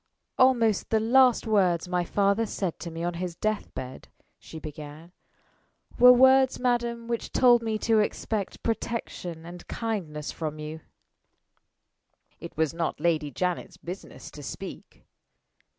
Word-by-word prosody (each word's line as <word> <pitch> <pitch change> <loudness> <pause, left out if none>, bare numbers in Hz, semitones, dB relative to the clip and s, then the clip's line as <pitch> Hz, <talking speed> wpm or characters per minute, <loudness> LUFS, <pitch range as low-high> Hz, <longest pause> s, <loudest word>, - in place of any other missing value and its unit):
"Almost 235 -5 +3
the 220 - +3
last 245 +2 +4
words 185 -6 +2
my 180 0 0
father 200 +5 +1
said 190 -4 -3
to 170 - -6
me 165 0 -6
on 175 0 -1
his 175 0 -4
death 215 +3 -2
bed," 130 0 -7 0.3
she - - -11
began, 155 +2 -9 0.9
"were 250 +1 +10
words, 260 +1 +5
madam, 235 -2 -1
which 235 -1 -3
told 240 -2 +5
me 220 -1 -1
to 220 +1 +2
expect 210 -1 -2
protection 200 -7 -4
and 175 +1 -10
kindness 175 -10 -4
from 155 -2 -5
you." 155 +1 -6 1.6
It - - -10
was 160 -1 +1
not 165 -3 -2
Lady 155 -2 +1
Janet's 180 +4 -3
business 180 +3 -9
to - - -10
speak. - - -9
195 Hz, 135 wpm, -27 LUFS, 165-230 Hz, 1.6 s, were